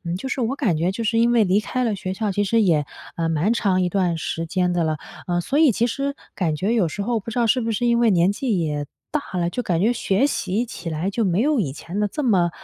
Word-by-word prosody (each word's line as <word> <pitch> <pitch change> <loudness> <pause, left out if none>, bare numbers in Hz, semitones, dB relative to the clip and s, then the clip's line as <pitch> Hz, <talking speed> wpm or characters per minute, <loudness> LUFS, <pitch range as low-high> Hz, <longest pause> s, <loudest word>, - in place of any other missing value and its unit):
嗯， 170 +1 -2
就 265 +8 -5
是 270 - -2
我 245 +4 -1
感 210 - +1
觉 170 +4 +1
就 230 +4 -4
是 225 +1 +1
因 235 +1 +4
为 230 -2 +4
离 195 +2 +3
开 255 +3 -2
了 225 - 0
学 190 -1 -4
校 210 0 -1
其 205 +2 0
实 225 +2 +2
也， 155 -6 +2 0.3
呃， 165 -1 0
蛮 165 +8 +1
长 190 -5 +1
一 180 - +1
段 180 -2 0
时 165 +1 -3
间 180 +1 0
的 175 -2 +1
了。 155 -1 0 0.3
呃， 175 -1 0
所 275 - -1
以 315 -3 +6
其 235 +3 +1
实 275 +4 -2 0.2
感 160 -5 -1
觉 195 +8 0
有 215 -8 +2
时 200 +6 -4
候 235 +1 0
不 230 - -7
知 245 - -3
道 235 - +3
是 250 +3 +3
不 230 -1 -2
是 240 +3 0
因 235 0 +3
为 235 -1 +4
年 180 0 +3
纪 220 -2 -1
也 150 -3 -2 0.3
大 285 -11 -3
了， 170 -1 +1
就 245 +8 -3
感 175 -5 0
觉 225 +5 +3
学 205 +3 +1
习 220 -4 -1
起 175 -7 -7
来 160 +5 -2
就 225 +2 0
没 185 +2 +1
有 295 +1 +2
以 150 -10 -1
前 170 +7 -5
地 210 - +2
这 300 - -4
么， 190 -9 +3
200 Hz, 310 characters per minute, -22 LUFS, 175-235 Hz, 0.3 s, 以